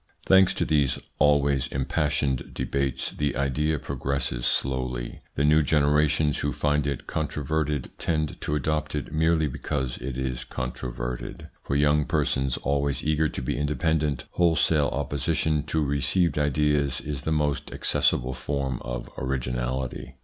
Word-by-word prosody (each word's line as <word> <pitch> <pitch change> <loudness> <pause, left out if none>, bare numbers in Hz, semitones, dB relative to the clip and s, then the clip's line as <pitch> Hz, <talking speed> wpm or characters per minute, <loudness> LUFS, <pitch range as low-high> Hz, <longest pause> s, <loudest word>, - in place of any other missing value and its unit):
Thanks 95 0 +5
to - - 0
these 75 -4 +2 0.2
always 70 -2 +3
impassioned 65 0 -1
debates, 70 -1 -1
the 75 -1 -1
idea 70 +4 +1
progresses 70 -3 -2
slowly. 65 -2 -1 0.2
The 70 - +1
new 75 +1 +5
generations 75 0 +2
who 70 - -1
find 75 -1 +1
it 70 -3 -3
controverted 75 -2 -2
tend 75 -2 -1
to 75 - -1
adopt 75 +1 -1
it 75 +1 -4
merely 80 0 +3
because 65 -2 -3
it 65 -2 -4
is 65 -1 -2
controverted. - - -5
For 70 - -2
young 75 +1 +3
persons, 65 -1 0
always 70 0 0
eager 75 0 +2
to - - -5
be - - -1
independent, 75 0 0
wholesale 80 -3 +3
opposition 70 +2 0
to 75 0 0
received 70 +3 +1
ideas 75 -2 +1
is 70 -3 -5
the 80 - -2
most 75 -2 0
accessible 65 +1 +1
form 65 -1 -2
of - - -4
originality. 65 0 -3
70 Hz, 135 wpm, -26 LUFS, 65-75 Hz, 0.2 s, Thanks